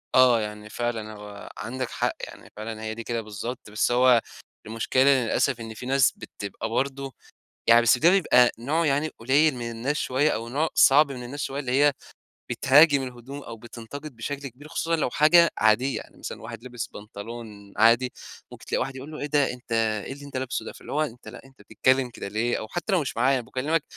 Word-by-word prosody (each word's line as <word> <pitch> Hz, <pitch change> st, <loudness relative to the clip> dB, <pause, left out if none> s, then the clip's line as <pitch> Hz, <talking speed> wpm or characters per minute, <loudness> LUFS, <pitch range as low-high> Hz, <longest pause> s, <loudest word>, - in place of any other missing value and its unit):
آه. 125 Hz, -3 st, +6 dB
يعني 105 Hz, 0 st, -6 dB
فعلًا 115 Hz, -2 st, -3 dB
هو 105 Hz, -1 st, -10 dB
عندك 130 Hz, +2 st, -4 dB
حق. -, -, -1 dB
يعني -, -, -13 dB
فعلًا 110 Hz, +1 st, -6 dB
هي 110 Hz, 0 st, -3 dB
دي 115 Hz, -, -6 dB
كده 115 Hz, 0 st, -2 dB
بالضبط، 110 Hz, +2 st, -7 dB
بس 105 Hz, +3 st, +1 dB
هو 125 Hz, -1 st, +5 dB, 0.4 s
المشكلة 115 Hz, +4 st, 0 dB
إن 135 Hz, -3 st, +4 dB
للأسف 125 Hz, +2 st, +1 dB
إن 110 Hz, -1 st, -7 dB
في 115 Hz, -, -9 dB
ناس 135 Hz, +1 st, +3 dB
بتبقى 100 Hz, +2 st, -7 dB
برضه 135 Hz, +2 st, -2 dB, 0.5 s
يعني 115 Hz, +1 st, +7 dB
بس 120 Hz, +1 st, +4 dB
ده 165 Hz, +6 st, +5 dB
بيبقى 125 Hz, -10 st, +5 dB
نوع 155 Hz, +8 st, 0 dB
يعني 145 Hz, +2 st, +1 dB
قليّل 140 Hz, +6 st, +3 dB
من 120 Hz, -1 st, -5 dB
الناس 120 Hz, +6 st, -2 dB
شوية، 145 Hz, +2 st, +1 dB
أو 115 Hz, -2 st, -3 dB
نوع 150 Hz, +6 st, 0 dB
صعب 140 Hz, +1 st, +6 dB
من 125 Hz, -2 st, -7 dB
الناس 140 Hz, +4 st, -7 dB
شوية 135 Hz, +1 st, -3 dB
اللي 130 Hz, -3 st, -3 dB
هي 145 Hz, +2 st, +4 dB, 0.6 s
بتهاجم 140 Hz, +1 st, +5 dB
الهدوم، 130 Hz, +3 st, -8 dB
أو 115 Hz, -1 st, -9 dB
بتنتقد 120 Hz, +5 st, -9 dB
بشكل 140 Hz, +5 st, -5 dB
كبير 135 Hz, +4 st, -13 dB
خصوصًا 165 Hz, +2 st, -1 dB
لو 155 Hz, -, 0 dB
حاجة 165 Hz, +5 st, +5 dB
عادية. 115 Hz, +5 st, +3 dB
يعني -, -, -11 dB
مثلًا -, -, -7 dB
واحد 115 Hz, 0 st, -9 dB
لبس 120 Hz, -3 st, -5 dB
بنطلون 105 Hz, -1 st, -10 dB
عادي، 115 Hz, +4 st, +4 dB, 0.4 s
ممكن -, -, -12 dB
تلاقي -, -, -1 dB
واحد 135 Hz, 0 st, -3 dB
يقول 135 Hz, +3 st, -8 dB
له 155 Hz, -, -7 dB
:"إيه -, -, -3 dB
ده 145 Hz, -3 st, +2 dB
أنت 125 Hz, -1 st, -14 dB, 0.3 s
إيه -, -, -5 dB
اللي 145 Hz, +1 st, -11 dB
انت 140 Hz, -2 st, -6 dB
لابسه 130 Hz, -1 st, -3 dB
ده؟!" -, -, -6 dB
فاللي -, -, -12 dB
هو 150 Hz, -, +1 dB
أنت 125 Hz, -6 st, -5 dB
لأ -, -, -10 dB
أنت 135 Hz, -4 st, -19 dB
بتتكلّم 130 Hz, +5 st, +1 dB
كده 120 Hz, -, -7 dB
ليه؟ 110 Hz, +4 st, -1 dB
أو 110 Hz, -, -6 dB
حتّى 175 Hz, -, -3 dB
لو 180 Hz, -, +3 dB
مش 135 Hz, -, -5 dB
معايا، 130 Hz, +3 st, +3 dB
أنا 125 Hz, -, -5 dB
باكلّمك 150 Hz, +6 st, -1 dB
125 Hz, 210 wpm, -25 LUFS, 115-140 Hz, 0.6 s, يعني